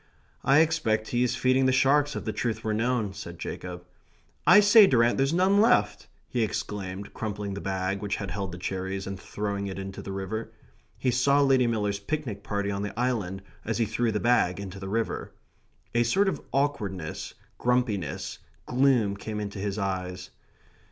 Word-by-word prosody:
"I 135 +4 +6
expect 155 -10 +1
he's 125 0 +1
feeding 130 +1 +3
the - - +4
sharks, 140 +3 +3
if - - -5
the - - -2
truth 115 -3 -2
were 110 - 0
known," 115 -2 0
said 85 -4 -8
Jacob. 90 +1 -6 0.6
"I 205 - +9
say, 205 0 +8
Durrant, 120 -4 +3
there's 135 +1 +2
none 190 +4 +4
left!" 105 - +3 0.2
he 120 - -1
exclaimed, 100 -2 -3
crumpling 105 -2 -4
the 100 - -5
bag 95 0 -2
which 100 -1 -1
had 100 -2 -5
held 100 -1 -3
the 90 - -7
cherries, 95 +1 -3
and 95 -1 -5
throwing 100 -1 -3
it 95 - -5
into 95 0 -6
the 95 - -7
river. 95 +3 -4 0.4
He 130 - +1
saw 140 +4 +3
Lady 135 -3 +4
Miller's 105 -3 0
picnic 115 -3 -4
party 100 -1 -2
on 100 0 -2
the 105 +2 -5
island 105 -7 -1 0.2
as 115 - -2
he 115 - +2
threw 110 +2 0
the 105 - -1
bag 115 -7 +2
into 95 -1 -7
the 95 0 -6
river. 115 +2 -2 0.6
A 120 - +3
sort 190 - +3
of 190 - -1
awkwardness, 105 - -2 0.2
grumpiness, 120 -6 -1 0.3
gloom 125 -6 +3
came 105 +1 -5
into 100 -1 -5
his 100 0 -2
eyes. 90 -2 -3
105 Hz, 180 wpm, -27 LUFS, 95-125 Hz, 0.6 s, I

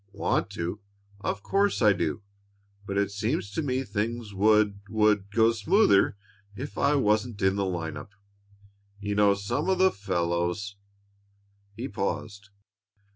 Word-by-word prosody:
"Want 100 - 0
to? 85 +4 -4 0.4
Of 100 0 -3
course 200 +1 +1
I 105 -4 +5
do! 90 -1 -2 0.6
But 100 - -2
it 100 0 +1
seems 105 +2 -2
to 160 - -2
me 130 -3 -1
things 110 0 -3
would 105 0 +3
would 105 -2 +2
go 115 +2 +4
smoother 115 - +3 0.4
if 140 +6 -7
I 145 - +2
wasn't 110 -3 +1
in 95 0 +3
the 100 -1 0
line 85 -4 -3
up. - - -9 0.9
You 105 0 -3
know 100 -1 +4
some 100 - -2
of 190 - +2
the 190 +1 +4
fellows 90 +1 -2 0.5
" 100 0 -39
He 125 +4 -4
paused. 100 -2 -4
100 Hz, 145 wpm, -27 LUFS, 100-115 Hz, 0.9 s, I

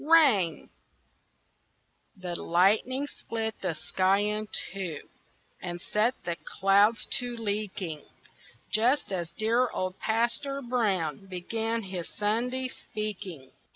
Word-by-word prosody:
RAIN 275 - +4 1.5
The 180 -2 -4
lightning 215 +10 +3
split 225 -5 -4
the 180 -4 -1
sky 190 +5 +2
in 210 +1 -1 0.3
two 180 -7 -5 0.5
And 175 -1 -4
set 215 +7 +1
the 170 -1 -2
clouds 200 +3 +3
to 245 -1 -3
leaking 200 -7 -3 0.7
Just 240 +3 +3
as 170 -3 -2
dear 230 +7 +2
old 185 0 -3
Pastor 240 +5 0
Brown 195 - 0
Began 225 +5 -2
his 185 -3 -5
Sunday 245 +5 0
speaking. 195 - -6
210 Hz, 105 wpm, -29 LUFS, 185-235 Hz, 1.5 s, RAIN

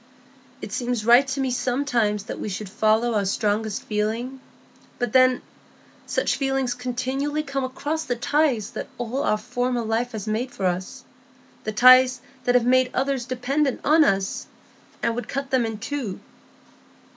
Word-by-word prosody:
It - - -6
seems 245 -4 -2
right 245 +4 +6
to 270 +1 -3
me 265 -1 0
sometimes 245 -5 0
that - - -7
we - - -4
should 200 +1 -5
follow 220 +3 +2
our 210 -2 +1
strongest 210 +2 -1
feeling; 225 +5 -2 0.6
but 245 -3 -2
then, 255 -1 +4 0.6
such - - 0
feelings 270 -2 0
continually 260 +4 -2
come 275 -2 -3
across 290 +5 -3
the 245 - -1
ties 245 -3 +1
that - - -5
all 245 +3 -2
our 215 - +1
former 245 +2 -2
life 230 +2 -1
has 215 -2 -5
made 225 +4 -1
for 195 - -4
us,—the 255 +6 -6
ties 255 +2 +7 0.3
that 245 - +2
have 245 -1 +4
made 255 0 +4
others 265 -2 0
dependent 265 +2 0
on 310 +2 +6
us,—and 195 +1 -3
would 245 +1 -5
cut 275 +1 -4
them 250 -3 +2
in 225 -1 -5
two. 225 -3 -4
245 Hz, 155 wpm, -24 LUFS, 220-265 Hz, 0.6 s, ties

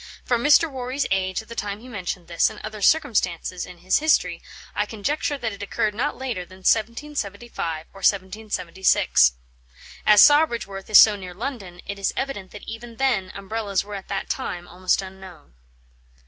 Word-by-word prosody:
From 240 -1 +1
Mr. 300 +3 +6
Warry's 260 0 -3
age 190 +1 0
at - - -22
the 230 - -8
time 205 -2 -4
he 245 - -13
mentioned 185 -6 -5
this, 170 -1 +2
and - - -10
other 215 -1 -7
circumstances 195 - +1
in 180 - -11
his 185 +2 +1
history, 180 - +2 0.3
I 205 - -1
conjecture 285 +7 -2
that 225 -5 -3
it 200 - -10
occurred 210 +1 -1
not 225 - -2
later 245 -8 -3
than 185 +1 -15
1775 220 - -1
or 195 - -12
1776. 190 - +2 0.7
As 210 -1 +8
Sawbridgeworth 235 -11 +3
is 215 - +8
so 215 -2 +8
near 185 -3 -9
London, 200 -7 -6
it 200 0 -6
is 195 - 0
evident 235 -9 -3
that 205 - -12
even 230 +1 -8
then 220 -8 0
umbrellas 200 0 -2
were 205 +1 -9
at 195 -1 -7
that 195 -1 -3
time 175 0 -4
almost 185 +2 0
unknown." 190 - -12
205 Hz, 170 wpm, -23 LUFS, 185-235 Hz, 0.7 s, As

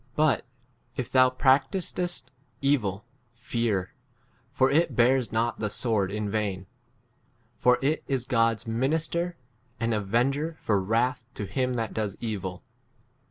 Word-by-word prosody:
But 150 -8 +2 0.5
if 130 - -3
thou 130 -1 +6
practisest 145 +7 +1 0.3
evil, 110 -8 +1 0.3
fear; 115 -5 -1 0.6
for 130 0 +2
it 165 +4 +2
bears 125 0 +3
not 115 +2 0
the 105 - -1
sword 105 -4 0
in 105 0 -2
vain; 100 -3 -2 0.9
for 125 +3 +4
it 150 +3 +1
is 130 -4 -1
God's 115 -3 +2
minister, 160 +9 -1 0.4
an 115 0 0
avenger 125 +10 0
for 100 -3 +1
wrath 120 +5 0
to 105 - -4
him 125 +4 -1
that 115 -2 -1
5 - - -12
does 105 -3 -2
evil. 95 -6 -4
120 Hz, 130 wpm, -27 LUFS, 105-135 Hz, 0.9 s, thou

